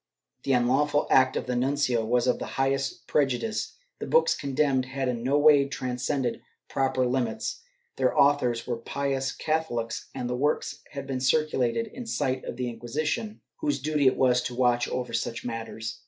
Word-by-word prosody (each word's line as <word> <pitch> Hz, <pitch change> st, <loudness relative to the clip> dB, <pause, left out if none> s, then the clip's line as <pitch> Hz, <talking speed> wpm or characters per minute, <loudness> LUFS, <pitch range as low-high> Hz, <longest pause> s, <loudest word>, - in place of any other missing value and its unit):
The 135 Hz, -, +2 dB
unlawful 135 Hz, +4 st, +2 dB
act 130 Hz, 0 st, +5 dB
of -, -, -3 dB
the 125 Hz, -1 st, -2 dB
nuncio 130 Hz, -2 st, +1 dB
was 120 Hz, +2 st, +1 dB
of 125 Hz, -, +1 dB
the -, -, -4 dB
highest 135 Hz, 0 st, 0 dB
prejudice; 145 Hz, -, 0 dB, 0.2 s
the -, -, -5 dB
books 480 Hz, 0 st, +4 dB
condemned 140 Hz, -2 st, 0 dB
had 135 Hz, 0 st, -2 dB
in 120 Hz, -2 st, -2 dB
no 135 Hz, +4 st, +2 dB
way 145 Hz, -2 st, +6 dB
transcended 125 Hz, 0 st, -2 dB, 0.3 s
proper 130 Hz, -1 st, +1 dB
limits; 125 Hz, -3 st, -2 dB, 0.4 s
their 130 Hz, -1 st, +1 dB
authors 125 Hz, -5 st, +3 dB
were 120 Hz, -2 st, -2 dB
pious 135 Hz, +2 st, -2 dB
Catho 160 Hz, 0 st, -1 dB
lics 115 Hz, -1 st, -3 dB
and 125 Hz, -2 st, -3 dB
the 125 Hz, -, -2 dB
works 145 Hz, +4 st, -1 dB
had 140 Hz, -1 st, -5 dB
been 135 Hz, -1 st, -3 dB
circulated 145 Hz, -, +1 dB
in 235 Hz, +2 st, -9 dB
sight 130 Hz, -, -1 dB
of -, -, -5 dB
the 125 Hz, 0 st, -3 dB
Inquisition, 150 Hz, -, -3 dB, 0.2 s
whose 295 Hz, -2 st, 0 dB
duty 150 Hz, -3 st, +1 dB
it 130 Hz, -, +3 dB
was 125 Hz, -1 st, +3 dB
to 125 Hz, -, -5 dB
watch 120 Hz, -1 st, +2 dB
over 125 Hz, -2 st, -3 dB
such 115 Hz, 0 st, -2 dB
matters. 115 Hz, 0 st, -5 dB
130 Hz, 175 wpm, -27 LUFS, 125-145 Hz, 0.4 s, way